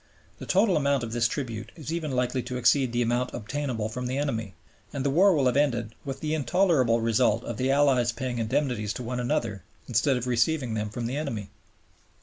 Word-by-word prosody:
The -, -, -8 dB
total 195 Hz, -2 st, +3 dB
amount 140 Hz, -3 st, +1 dB
of 115 Hz, -, -4 dB
this 120 Hz, 0 st, +2 dB
tribute 115 Hz, -4 st, -5 dB
is 160 Hz, -1 st, -6 dB
even 165 Hz, -3 st, -2 dB
likely 125 Hz, 0 st, 0 dB
to 125 Hz, +1 st, -5 dB
exceed 125 Hz, +1 st, +3 dB
the 120 Hz, 0 st, +1 dB
amount 120 Hz, +2 st, -1 dB
obtainable 120 Hz, -1 st, -3 dB
from 125 Hz, +3 st, -4 dB
the 130 Hz, +2 st, -2 dB
enemy; 115 Hz, -, -2 dB, 0.4 s
and 140 Hz, -1 st, -4 dB
the 140 Hz, -, +2 dB
war 185 Hz, +5 st, +5 dB
will 140 Hz, -3 st, +2 dB
have 125 Hz, 0 st, +2 dB
ended 120 Hz, -6 st, +1 dB
with 135 Hz, -2 st, -6 dB
the 155 Hz, 0 st, -1 dB
intolerable 145 Hz, -5 st, +2 dB
result 115 Hz, 0 st, +2 dB
of 120 Hz, -, -5 dB
the 130 Hz, +1 st, 0 dB
Allies 135 Hz, -4 st, +3 dB
paying 120 Hz, +1 st, -4 dB
indemnities 110 Hz, -2 st, -1 dB
to 125 Hz, -, -6 dB
one 125 Hz, +1 st, -3 dB
another 120 Hz, -, -1 dB, 0.3 s
instead 125 Hz, +3 st, +2 dB
of 125 Hz, -, -3 dB
receiving 125 Hz, +1 st, +1 dB
them 105 Hz, -1 st, -2 dB
from 115 Hz, +3 st, -5 dB
the 125 Hz, +4 st, -2 dB
enemy. 110 Hz, -9 st, -4 dB
125 Hz, 205 wpm, -27 LUFS, 115-140 Hz, 0.4 s, war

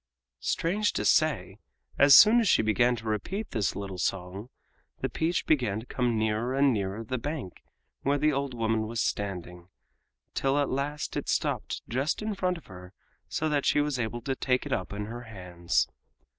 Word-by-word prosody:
Strange 205 Hz, +5 st, 0 dB
to -, -, -2 dB
say, 115 Hz, -, +2 dB, 0.4 s
as 140 Hz, -1 st, +9 dB
soon 225 Hz, +3 st, +8 dB
as 225 Hz, -5 st, +2 dB
she -, -, +4 dB
began 120 Hz, +3 st, +3 dB
to 115 Hz, -1 st, -10 dB
repeat 140 Hz, -, -3 dB
this 105 Hz, -6 st, 0 dB
little 95 Hz, -2 st, -5 dB
song 95 Hz, +5 st, -3 dB, 0.5 s
the -, -, -1 dB
peach 165 Hz, +2 st, -1 dB
began 125 Hz, -9 st, +1 dB
to 110 Hz, -, -10 dB
come 120 Hz, -3 st, 0 dB
nearer 110 Hz, +4 st, 0 dB
and 135 Hz, -1 st, +4 dB
nearer 100 Hz, +1 st, -3 dB
the 130 Hz, +3 st, -3 dB
bank 145 Hz, -, -5 dB, 0.4 s
where 140 Hz, +1 st, +1 dB
the 150 Hz, +1 st, +2 dB
old 140 Hz, -2 st, -2 dB
woman 110 Hz, -1 st, 0 dB
was 115 Hz, +1 st, -4 dB
standing, 90 Hz, -5 st, -3 dB, 0.7 s
till 135 Hz, +1 st, +1 dB
at 145 Hz, -1 st, +1 dB
last 145 Hz, +3 st, -3 dB
it -, -, -3 dB
stopped -, -, -1 dB
just 135 Hz, -, -1 dB
in 215 Hz, 0 st, -2 dB
front 185 Hz, -2 st, -1 dB
of 165 Hz, -, -14 dB
her 90 Hz, 0 st, -12 dB, 0.4 s
so 155 Hz, -, -1 dB
that 145 Hz, -2 st, +1 dB
she -, -, +3 dB
was 145 Hz, -3 st, 0 dB
able 120 Hz, +1 st, -3 dB
to 135 Hz, +3 st, -2 dB
take 125 Hz, -1 st, 0 dB
it -, -, -2 dB
up 90 Hz, -, -2 dB
in 105 Hz, +1 st, -4 dB
her 120 Hz, +3 st, -7 dB
hands. 90 Hz, -5 st, -1 dB
120 Hz, 185 wpm, -28 LUFS, 105-145 Hz, 0.7 s, as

